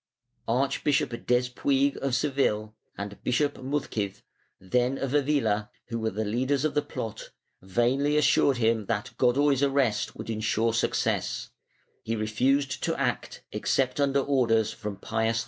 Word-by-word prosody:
Archbishop 135 Hz, +3 st, +1 dB, 0.2 s
Despuig 130 Hz, +3 st, +2 dB
of 135 Hz, -2 st, -1 dB
Seville 110 Hz, -8 st, 0 dB, 0.2 s
and 100 Hz, 0 st, -7 dB
Bishop 145 Hz, +3 st, +1 dB
Muzquiz, 130 Hz, -7 st, -3 dB, 0.4 s
then 125 Hz, +7 st, 0 dB
of 135 Hz, -1 st, -3 dB
Avila, 135 Hz, -8 st, +1 dB, 0.2 s
who 115 Hz, -1 st, -2 dB
were 110 Hz, 0 st, 0 dB
the 110 Hz, +1 st, -3 dB
leaders 130 Hz, +6 st, 0 dB
of 155 Hz, -, 0 dB
the 150 Hz, -, +2 dB
plot, 115 Hz, -6 st, -6 dB, 0.3 s
vainly 125 Hz, +10 st, +1 dB
assured 140 Hz, -2 st, +4 dB
him 110 Hz, -3 st, +1 dB
that 105 Hz, -, -2 dB
Godoy's 135 Hz, +2 st, +3 dB
arrest 135 Hz, -6 st, +1 dB
would -, -, -5 dB
insure 110 Hz, +1 st, 0 dB
success; 115 Hz, -, -1 dB, 0.5 s
he 115 Hz, -, -2 dB
refused 130 Hz, +6 st, 0 dB
to -, -, -1 dB
act -, -, -2 dB
except 130 Hz, 0 st, 0 dB
under 140 Hz, -1 st, +3 dB
orders 115 Hz, -6 st, +2 dB
from 105 Hz, -2 st, -6 dB
Pius 110 Hz, +2 st, -1 dB
\1. -, -, +1 dB
125 Hz, 140 wpm, -27 LUFS, 110-140 Hz, 0.5 s, assured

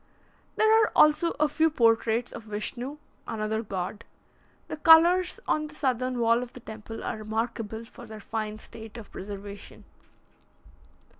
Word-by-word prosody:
There 440 Hz, +1 st, +5 dB
are 435 Hz, -, +2 dB
also 305 Hz, +3 st, +5 dB
a 305 Hz, -, +4 dB
few 320 Hz, +2 st, +2 dB
portraits 230 Hz, -3 st, +2 dB
of 225 Hz, -, -9 dB
Vischnu, 240 Hz, +6 st, -4 dB, 0.3 s
another 220 Hz, 0 st, -2 dB
god. 200 Hz, 0 st, -5 dB, 0.6 s
The -, -, -5 dB
colours 340 Hz, +3 st, +6 dB
on 305 Hz, 0 st, +1 dB
the 300 Hz, -, -14 dB
southern 255 Hz, -3 st, -1 dB
wall 230 Hz, 0 st, +3 dB
of 250 Hz, -1 st, -7 dB
the -, -, -10 dB
temple 220 Hz, 0 st, -9 dB
are 225 Hz, -, -3 dB
remarkable 220 Hz, 0 st, -3 dB
for 235 Hz, +1 st, -13 dB
their 220 Hz, 0 st, -9 dB
fine 215 Hz, 0 st, -4 dB
state 220 Hz, +1 st, -10 dB
of 225 Hz, -, -11 dB
preservation. 200 Hz, +1 st, -9 dB
230 Hz, 145 wpm, -27 LUFS, 215-295 Hz, 0.6 s, colours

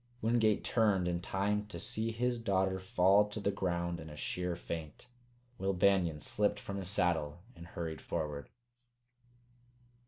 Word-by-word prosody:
Wingate 110 Hz, -2 st, +2 dB
turned 105 Hz, -6 st, +2 dB
in 85 Hz, -1 st, -1 dB
time 105 Hz, +3 st, -1 dB
to 85 Hz, -5 st, -7 dB
see 110 Hz, +6 st, -1 dB
his 120 Hz, +1 st, 0 dB
daughter 95 Hz, -3 st, +1 dB
fall 95 Hz, +2 st, +4 dB
to 105 Hz, -, -5 dB
the 100 Hz, -1 st, +1 dB
ground 85 Hz, -3 st, -1 dB
in 80 Hz, -, -8 dB
a 75 Hz, -, -9 dB
sheer 90 Hz, +4 st, -2 dB
faint. 80 Hz, +1 st, -6 dB, 0.5 s
Will 95 Hz, +1 st, +1 dB
Banion 90 Hz, -4 st, +3 dB
slipped -, -, 0 dB
from 100 Hz, -, -5 dB
his 95 Hz, -2 st, -3 dB
saddle 85 Hz, -4 st, +1 dB
and 85 Hz, -, -11 dB
hurried 80 Hz, -4 st, -5 dB
forward. 75 Hz, -3 st, -3 dB
95 Hz, 150 wpm, -33 LUFS, 85-105 Hz, 0.5 s, fall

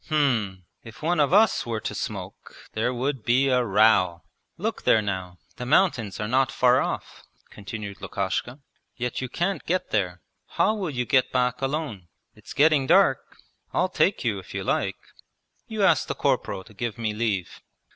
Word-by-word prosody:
'H'm, 115 Hz, -, 0 dB, 0.2 s
if 115 Hz, +6 st, -12 dB
one 175 Hz, +2 st, +1 dB
of 145 Hz, 0 st, +3 dB
us 210 Hz, +2 st, +4 dB
were 115 Hz, -3 st, -3 dB
to -, -, -4 dB
smoke -, -, -6 dB, 0.2 s
there 115 Hz, +3 st, 0 dB
would 130 Hz, 0 st, -2 dB
be 130 Hz, +4 st, +3 dB
a 125 Hz, -1 st, +3 dB
row! 100 Hz, -5 st, +3 dB, 0.3 s
Look -, -, -3 dB
there 110 Hz, -, +4 dB
now, 95 Hz, -4 st, -4 dB, 0.2 s
the 125 Hz, -, -5 dB
mountains 130 Hz, -, +2 dB
are 105 Hz, -, -2 dB
not 130 Hz, +3 st, +2 dB
far 125 Hz, +1 st, +4 dB
off,' -, -, -4 dB, 0.3 s
continued 100 Hz, 0 st, -7 dB
Lukashka, 120 Hz, +7 st, -3 dB, 0.3 s
'yet 125 Hz, +1 st, -3 dB
you 130 Hz, -, -4 dB
can't 175 Hz, +2 st, -2 dB
get 185 Hz, +2 st, -1 dB
there! 90 Hz, -4 st, -1 dB, 0.3 s
How 215 Hz, -, +4 dB
will 200 Hz, -6 st, -3 dB
you 125 Hz, -4 st, -2 dB
get 130 Hz, +1 st, +2 dB
back 125 Hz, 0 st, 0 dB
alone? 135 Hz, -, -3 dB, 0.3 s
It's -, -, -12 dB
getting 145 Hz, -1 st, +4 dB
dark. 195 Hz, +6 st, +3 dB, 0.4 s
I'll -, -, +2 dB
take -, -, +1 dB
you, -, -, 0 dB
if -, -, -11 dB
you -, -, -2 dB
like. -, -, -1 dB, 0.7 s
You 220 Hz, -3 st, -2 dB
ask -, -, +4 dB
the -, -, -3 dB
corporal 95 Hz, -, -1 dB
to 105 Hz, -, -17 dB
give 115 Hz, +1 st, -4 dB
me 110 Hz, -2 st, -2 dB
leave.' 105 Hz, -5 st, -2 dB
125 Hz, 175 wpm, -25 LUFS, 105-145 Hz, 0.7 s, us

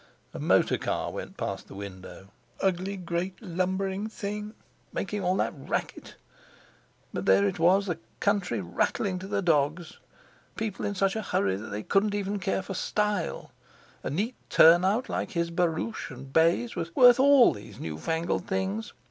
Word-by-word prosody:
A -, -, -6 dB
motor -, -, +3 dB
car -, -, -2 dB
went -, -, -7 dB
past -, -, -4 dB
the -, -, -11 dB
window. 95 Hz, -1 st, -9 dB, 0.3 s
Ugly 190 Hz, +1 st, 0 dB
great 180 Hz, +1 st, -3 dB
lumbering 190 Hz, +1 st, -2 dB
thing, 210 Hz, 0 st, -5 dB, 0.4 s
making 205 Hz, 0 st, -3 dB
all 180 Hz, +1 st, +2 dB
that -, -, 0 dB
racket! 135 Hz, -, -4 dB, 1.0 s
But -, -, -4 dB
there 95 Hz, +1 st, +5 dB
it 100 Hz, -, -3 dB
was, 185 Hz, +4 st, +4 dB
the 175 Hz, -4 st, -3 dB, 0.2 s
country 195 Hz, -, 0 dB
rattling 180 Hz, -, -1 dB
to 190 Hz, -, -7 dB
the 200 Hz, 0 st, -1 dB
dogs! 160 Hz, +1 st, 0 dB, 0.6 s
People 220 Hz, -3 st, -3 dB
in 205 Hz, -, -3 dB
such 195 Hz, +1 st, +1 dB
a 220 Hz, -, -1 dB
hurry 100 Hz, -, 0 dB
that 105 Hz, +3 st, -7 dB
they 105 Hz, +1 st, -4 dB
couldn't 205 Hz, +1 st, +2 dB
even 205 Hz, 0 st, -2 dB
care 190 Hz, +1 st, -1 dB
for 195 Hz, -, -6 dB
style—a 210 Hz, -1 st, -4 dB
neat 205 Hz, -, -1 dB, 0.2 s
turnout 185 Hz, +8 st, +5 dB
like -, -, -3 dB
his 170 Hz, -1 st, -1 dB
barouche 175 Hz, +5 st, -1 dB
and 135 Hz, 0 st, -10 dB
bays 170 Hz, +9 st, +3 dB
was 165 Hz, 0 st, -4 dB
worth 245 Hz, -1 st, +8 dB
all 275 Hz, -2 st, +7 dB
those 100 Hz, +1 st, -11 dB
new 80 Hz, -1 st, -5 dB
fangled 165 Hz, -, -1 dB
things. 190 Hz, +3 st, -2 dB
185 Hz, 160 wpm, -28 LUFS, 160-205 Hz, 1.0 s, worth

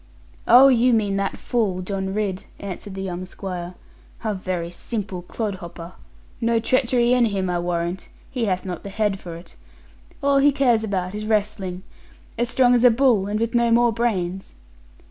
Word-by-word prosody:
'Oh, 255 Hz, +3 st, +9 dB
you 250 Hz, -1 st, +4 dB
mean 205 Hz, -3 st, 0 dB
that 195 Hz, -1 st, -2 dB
fool, 200 Hz, -7 st, -1 dB
John 190 Hz, 0 st, -3 dB
Ridd,' 195 Hz, -2 st, -2 dB
answered 195 Hz, 0 st, -7 dB
the 190 Hz, -, -4 dB
young 180 Hz, -1 st, -4 dB
squire; 180 Hz, -1 st, -6 dB, 0.5 s
'a 215 Hz, -1 st, 0 dB
very 185 Hz, -3 st, -3 dB
simple 195 Hz, -1 st, -5 dB
clod 210 Hz, +4 st, -4 dB
hopper. 170 Hz, 0 st, -9 dB, 0.5 s
No 230 Hz, 0 st, +2 dB
treachery 240 Hz, +1 st, +2 dB
in 250 Hz, -1 st, +4 dB
him 195 Hz, -4 st, -1 dB
I 175 Hz, -, 0 dB
warrant; 175 Hz, +1 st, -3 dB, 0.2 s
he 245 Hz, -4 st, -1 dB
hath 185 Hz, -2 st, -1 dB
not 180 Hz, -3 st, -5 dB
the 200 Hz, -, -7 dB
head 205 Hz, -1 st, -1 dB
for 170 Hz, -3 st, -8 dB
it. 170 Hz, +2 st, -13 dB, 0.7 s
All 280 Hz, 0 st, +4 dB
he 285 Hz, +1 st, +5 dB
cares 250 Hz, -5 st, +2 dB
about 190 Hz, -3 st, -2 dB
is 210 Hz, +1 st, -5 dB
wrestling. 205 Hz, -4 st, -1 dB, 0.5 s
As 240 Hz, +1 st, -1 dB
strong 245 Hz, 0 st, +4 dB
as 245 Hz, -1 st, +3 dB
a 250 Hz, -, +9 dB
bull, 230 Hz, -5 st, +3 dB
and 210 Hz, +1 st, -1 dB
with 230 Hz, 0 st, -1 dB
no 235 Hz, -1 st, +3 dB
more 235 Hz, 0 st, +4 dB
brains.' 190 Hz, -, -2 dB
205 Hz, 180 wpm, -23 LUFS, 185-235 Hz, 0.7 s, Oh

